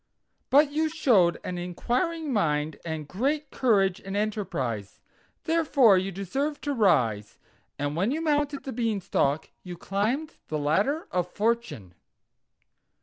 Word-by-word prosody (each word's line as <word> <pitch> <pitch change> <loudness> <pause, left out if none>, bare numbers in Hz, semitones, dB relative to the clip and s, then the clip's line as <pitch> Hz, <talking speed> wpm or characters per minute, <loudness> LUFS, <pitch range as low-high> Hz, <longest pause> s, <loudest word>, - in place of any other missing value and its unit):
But 290 +2 +5
you 315 +2 +1
showed 225 - +3
an 180 -1 -4
inquiring 260 - -2
mind, 155 -6 0
and 160 -3 -5
great 280 - -1
courage 195 -7 +2
and 195 +1 -5
enterprise, 170 - -3 0.4
therefore 295 - +4
you 190 +1 0
deserve 270 - -3
to 290 - -2
rise; 125 - +1 0.4
and 145 +1 -2
when 190 +7 +1
you 295 +5 -1
mounted 295 -3 0
the 270 - -5
Beanstalk 200 - 0
you 180 -1 -8
climbed 235 - -2
the 155 - -2
Ladder 200 - 0
of 180 -1 -1
Fortune." 220 - -2
205 Hz, 130 wpm, -27 LUFS, 170-280 Hz, 0.4 s, But